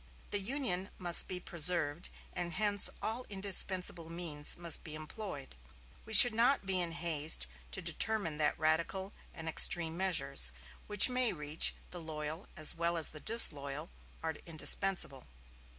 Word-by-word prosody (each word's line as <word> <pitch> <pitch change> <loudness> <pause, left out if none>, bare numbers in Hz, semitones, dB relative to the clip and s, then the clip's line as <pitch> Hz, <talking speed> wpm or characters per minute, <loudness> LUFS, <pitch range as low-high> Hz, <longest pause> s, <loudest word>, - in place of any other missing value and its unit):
The 205 - -3
Union 200 -4 -4
must 175 -2 +6
be 185 - -6
preserved; 170 -2 -1 0.2
and 175 -1 -6
hence 205 +2 -1
all 230 +3 -5
indispensable 185 -4 0
means 165 -4 -4
must 170 -2 -2
be 155 -2 -9
employed. 155 -2 -10 0.5
We 220 - -11
should 245 +3 +10
not 240 +1 -1
be 190 -1 -2
in 170 -1 -5
haste 160 - 0 0.3
to - - -7
determine 170 -1 -3
that 150 - -1
radical 170 +5 -4 0.2
and 160 0 -10
extreme 165 0 +3
measures, 140 - 0 0.4
which 210 -1 +8
may 250 -1 -2
reach 150 -1 0 0.2
the 175 - -11
loyal 155 +2 -9
as 155 -1 +3
well 170 0 -4
as 160 - 0
the 155 - -7
disloyal, 150 -8 +4 0.3
are 160 0 -5
indispensable." 165 -3 -1
170 Hz, 145 wpm, -30 LUFS, 155-195 Hz, 0.5 s, should